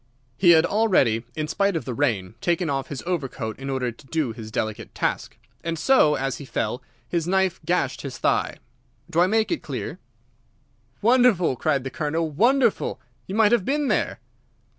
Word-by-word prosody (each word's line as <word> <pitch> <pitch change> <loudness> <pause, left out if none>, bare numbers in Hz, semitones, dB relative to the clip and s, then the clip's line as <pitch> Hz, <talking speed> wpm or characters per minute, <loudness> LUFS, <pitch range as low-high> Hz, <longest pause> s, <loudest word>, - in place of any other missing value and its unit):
He 175 - +4
had 165 -1 +7
already, 180 - +2
in 155 -1 -2
spite 200 +4 +1
of 165 - -2
the 125 - -3
rain, 110 -9 -1
taken 170 +1 0
off 135 -1 -2
his 140 -3 -6
overcoat 135 -10 -3
in 135 0 -5
order 130 -2 -1
to 125 +4 -18
do 155 -4 -1
his 110 -1 -8
delicate 110 -1 -4
task, - - -2 0.3
and 165 0 -2
so, 155 - +4
as 135 -1 -2
he - - -7
fell, 120 -2 -2 0.3
his 170 +1 -1
knife 190 -1 +1
gashed 145 -7 0
his 135 -2 -6
thigh. - - 0 0.5
Do 165 - +1
I 180 - +5
make 220 - +1
it 340 - -1
clear?" 150 +5 -5 1.0
"Wonderful!" 230 - +4
cried 140 0 0
the 135 - -5
Colonel. 160 +2 -1
"Wonderful! 250 - +2 0.3
You 190 - -4
might 220 -1 +4
have 240 -5 +3
been 290 +5 0
there!" - - 0
160 Hz, 180 wpm, -24 LUFS, 130-190 Hz, 1.0 s, had